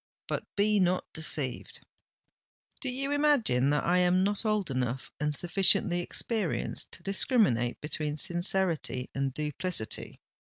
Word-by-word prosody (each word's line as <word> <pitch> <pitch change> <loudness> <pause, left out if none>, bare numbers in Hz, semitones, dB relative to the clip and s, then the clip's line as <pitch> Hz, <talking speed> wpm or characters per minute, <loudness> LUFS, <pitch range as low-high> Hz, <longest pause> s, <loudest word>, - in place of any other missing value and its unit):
But - - -3
be 210 0 +3
not 180 0 +1
deceived——" 150 -5 0 1.0
"Do 270 - -3
you 275 +3 -3
imagine 280 - +3
that 150 -1 +1
I 180 +2 +3
am 180 +1 +3
not 205 +3 -1
old 210 -7 0
enough 130 0 -3
and 150 0 -1
sufficiently 180 +1 +4
experienced 200 +1 -2
to - - -8
discriminate 195 - +2
between 150 0 -3
sincerity 175 -6 0
and 135 0 -1
duplicity?" 150 -2 -4
175 Hz, 125 wpm, -29 LUFS, 145-200 Hz, 1.0 s, sufficiently